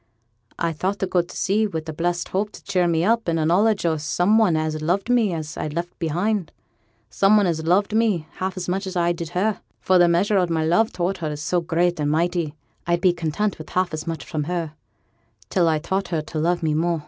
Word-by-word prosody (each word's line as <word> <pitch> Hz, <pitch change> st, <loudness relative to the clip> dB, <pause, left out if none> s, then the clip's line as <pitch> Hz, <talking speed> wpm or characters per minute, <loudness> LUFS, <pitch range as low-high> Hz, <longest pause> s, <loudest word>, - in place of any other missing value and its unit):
'I 170 Hz, -1 st, -1 dB
thought 190 Hz, +6 st, -2 dB
to 190 Hz, -, -1 dB
go 180 Hz, -1 st, +2 dB
to 170 Hz, -, -10 dB
sea 215 Hz, +3 st, +1 dB
wi' 160 Hz, -6 st, -4 dB
a 160 Hz, -, -5 dB
blessed 175 Hz, +2 st, -2 dB
hope 205 Hz, +3 st, -1 dB
to -, -, -12 dB
cheer 180 Hz, -2 st, +1 dB
me 165 Hz, -1 st, +1 dB
up, 230 Hz, 0 st, +1 dB
and 165 Hz, -1 st, +1 dB
a 155 Hz, -, +1 dB
knowledge 200 Hz, +4 st, +2 dB
o' 160 Hz, -2 st, +2 dB
some 175 Hz, +8 st, +2 dB
one 180 Hz, -8 st, +3 dB
as 155 Hz, 0 st, -2 dB
loved 190 Hz, +8 st, 0 dB
me 230 Hz, -5 st, +3 dB
as 155 Hz, -2 st, -5 dB
I'd 150 Hz, 0 st, -4 dB
left 175 Hz, +1 st, -4 dB
behind; 180 Hz, +4 st, -1 dB, 0.6 s
some 200 Hz, +2 st, +4 dB
one 205 Hz, -, +3 dB
as 160 Hz, -3 st, -1 dB
loved 200 Hz, +4 st, +2 dB
me 215 Hz, -8 st, +2 dB
half 190 Hz, 0 st, -3 dB
as 180 Hz, -, -4 dB
much 190 Hz, +2 st, -2 dB
as 190 Hz, -, -6 dB
I 175 Hz, -1 st, +2 dB
did 170 Hz, -1 st, -4 dB
her; 210 Hz, +3 st, 0 dB, 0.2 s
for 185 Hz, -1 st, +3 dB
th' 175 Hz, -1 st, +5 dB
measure 195 Hz, +4 st, +2 dB
o' 180 Hz, -, +2 dB
my 160 Hz, -1 st, 0 dB
love 195 Hz, +8 st, +3 dB
toward 185 Hz, +2 st, -1 dB
her 160 Hz, -4 st, -3 dB
is 150 Hz, 0 st, -5 dB
so 175 Hz, +3 st, +1 dB
great 175 Hz, 0 st, 0 dB
and 145 Hz, -1 st, 0 dB
mighty, 165 Hz, -1 st, 0 dB, 0.3 s
I'd 170 Hz, 0 st, +2 dB
be 185 Hz, -2 st, +4 dB
content 175 Hz, +4 st, -2 dB
wi' 155 Hz, -, -7 dB
half 185 Hz, -2 st, +1 dB
as 155 Hz, +2 st, -5 dB
much 165 Hz, -1 st, -4 dB
from 155 Hz, -3 st, -3 dB
her, 170 Hz, -2 st, -3 dB, 0.8 s
till 175 Hz, -2 st, +3 dB
I'd 155 Hz, -1 st, +1 dB
taught 195 Hz, +2 st, -1 dB
her 160 Hz, -3 st, -2 dB
to 155 Hz, 0 st, -5 dB
love 170 Hz, +2 st, 0 dB
me 155 Hz, -1 st, +1 dB
more. 165 Hz, +2 st, 0 dB
175 Hz, 240 wpm, -23 LUFS, 160-190 Hz, 0.8 s, th